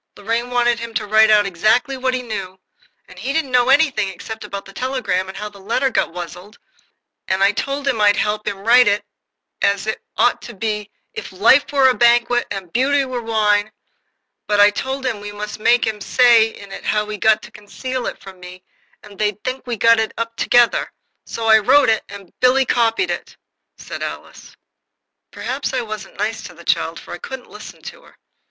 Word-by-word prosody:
Lorraine 230 +4 -2
wanted 240 -1 +1
him 230 -1 -7
to 215 - -1
write 220 +1 +5
out 210 -1 +5
exactly 220 - +1
what 260 0 -1
he 250 - -3
knew, 195 -5 -6 0.5
and 185 0 -14
he 260 +8 -3
didn't 310 -4 -1
know 250 0 +3
anything 270 -8 +3
except 220 +3 -8
about 200 -1 -7
the 195 - -13
telegram 250 -8 -2
and 190 0 -9
how 210 - -5
the 205 -1 -13
letter 235 +7 0
got - - 0
wuzzled, 180 +3 -9 0.7
and 190 +1 +1
I 200 - +5
told 275 +6 -3
him 240 -6 0
I'd 205 -1 +5
help 210 0 -1
him 195 0 -4
write 245 +1 +6
it 205 0 +1 0.6
as 200 0 +1
it 220 - -3 0.2
ought - - +2
to - - -10
be 210 0 -3 0.2
'if - - -7
life 230 +11 +4
were 275 -2 +4
a 260 - +4
banquet 240 0 +3
and 190 -4 -7
beauty 275 +2 +2
were 255 -2 -4
wine'; 215 -2 +1 0.8
but 210 -1 +1
I 205 0 +7
told 265 +5 -4
him 235 -5 -1
we 205 0 -7
must 210 +1 -7
make 240 +3 +3
him 215 -2 -3
say 235 -1 +5
in 200 -3 -12
it - - -8
how 210 0 0
he'd 210 -2 -6
got 220 -1 +3
to - - -12
conceal 240 +5 -5
it - - -6
from 190 -1 -13
me, 180 0 -12 0.4
or 205 - -13
they'd 210 0 -2
think 255 0 -4
we 240 -2 -3
got 230 +1 +5
it 220 - -2
up 230 0 -4
together. 240 0 +2 0.4
So 230 - -5
I 220 0 +6
wrote 275 +5 +4
it," 220 -1 +1
said - - -13
Alice, 200 - -9
"and 180 - -27
Billy 260 +1 +4
copied 235 +8 +1
it." - - -6 1.9
Perhaps - - -4
I 255 - 0
wasn't 215 -3 -8
nice 215 +3 -2
to - - -11
the - - -14
child, - - 0
for - - -10
I - - -7
couldn't 265 -2 -9
listen - - -11
to 480 0 -10
her. - - -21
220 Hz, 205 wpm, -19 LUFS, 205-250 Hz, 1.9 s, I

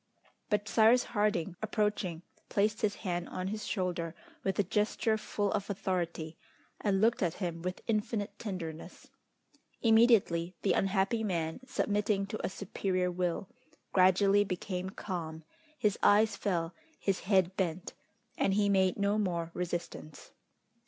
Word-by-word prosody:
But 210 -1 0
Cyrus 225 +4 +5
Harding 205 -5 0
approaching, 210 -5 -1 0.3
placed 210 +1 +1
his 210 -1 +1
hand 175 -1 -2
on 185 +1 -3
his 215 +1 -4
shoulder 175 -4 -2 0.3
with 195 - -1
a 205 - +3
gesture 210 +3 +1
full 205 -2 -2
of 205 -1 -2
authority, 170 -4 -2 0.4
and 195 -2 +1
looked 230 +4 +3
at 175 -4 +1
him 170 -3 -4
with 180 +1 -4
infinite 215 -1 -1
tenderness. 170 -7 -6 0.7
Immediately 220 -7 +4
the 200 - +3
unhappy 195 +3 +1
man, 165 -4 -1
submitting 205 -4 0
to 210 +2 -5
a - - 0
superior 185 -1 -1
will, 180 +1 -1 0.5
gradually 195 +2 +5
became 185 -1 -3
calm, 165 -5 -5 0.3
his 210 -6 +1
eyes 210 +2 +5
fell, 170 -4 -1 0.3
his 195 -2 0
head 190 -2 +2
bent, 180 -2 -2 0.5
and 195 - +2
he 205 -1 +3
made 190 -2 +3
no 200 +1 +1
more 170 -4 -1
resistance. 175 -3 -5
195 Hz, 135 wpm, -31 LUFS, 175-210 Hz, 0.7 s, Cyrus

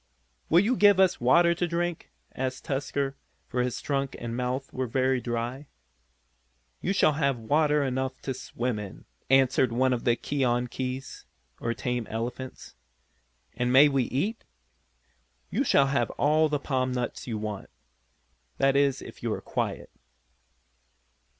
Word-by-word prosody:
"Will 170 +3 +6
you 230 +6 +1
give 205 -3 +5
us 190 -7 +3
water 170 +8 +5
to 175 +1 -1
drink?" 170 0 -2 0.2
asked 130 0 -4
Tusker, 135 0 -2 0.3
for 125 - -1
his 125 -1 -2
trunk 135 -2 -2
and 115 -1 -5
mouth 125 +2 -3
were 130 0 -2
very 130 +1 +1
dry. 120 +4 -3 1.1
"You 190 - 0
shall 190 -6 +4
have 140 -3 +1
water 150 +5 +2
enough 130 0 -2
to 135 - -2
swim 120 -2 -3
in," 100 -2 -9 0.2
answered 130 -2 +4
one 130 +2 +2
of 120 - -3
the 120 - +3
keonkies, 125 0 -2 0.3
or 115 0 -2
tame 120 +1 -2
elephants. 120 +3 -6 0.8
"And 125 +1 0
may 140 +3 +7
we 135 -3 +1
eat?" 200 - -2 1.1
"You - - +1
shall 140 - +4
have 135 -4 0
all 155 +2 +3
the 150 - +1
palm 130 -2 -1
nuts 125 0 -4
you 115 -3 -2
want. 105 -2 -5 0.9
That 135 0 +3
is 140 -1 +2
if - - -11
you - - -2
are - - -4
quiet." - - -3
130 Hz, 145 wpm, -27 LUFS, 125-145 Hz, 1.1 s, may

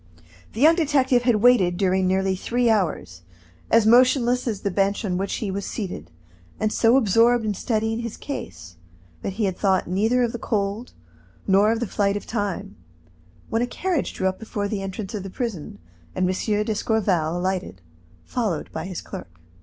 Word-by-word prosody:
The 225 - -5
young 315 +3 +7
detective 275 -6 +2
had 235 -3 +1
waited 195 -8 +4
during 190 0 +2
nearly 190 0 +1
three 235 +5 +1
hours, 150 - -1 0.5
as 225 -1 +4
motionless 250 +1 +4
as 215 -4 -2
the 200 - -1
bench 200 +4 0
on 180 -3 -1
which 195 +2 -2
he 205 -4 -3
was 200 +1 -3
seated, 180 - -5 0.5
and 215 0 0
so 230 +3 +4
absorbed 230 0 +3
in 210 - 0
studying 220 +2 -1
his 235 -2 -5
case 85 - -7 0.4
that 195 - -4
he 215 +2 -1
had 190 -2 -1
thought 190 -1 +1
neither 220 +8 +2
of 235 - 0
the 235 - -6
cold 210 +2 -2 0.5
nor 200 +3 +4
of 230 - 0
the 240 - -1
flight 200 -1 0
of - - -8
time, 205 -2 -3 0.8
when 225 - +1
a 245 - 0
carriage 350 +4 -2
drew 190 - 0
up 190 0 -2
before 210 -2 -3
the 200 -1 -3
entrance 195 +1 -5
of 210 - -3
the 195 - -7
prison, 200 - -5 0.4
and 185 0 +1
M. 205 +3 0
d'Escorval 200 -7 0
alighted, 180 - -3 0.5
followed 210 -10 -2
by 160 - -5
his 185 -3 -5
clerk. 90 -2 -10
205 Hz, 180 wpm, -23 LUFS, 190-235 Hz, 0.8 s, young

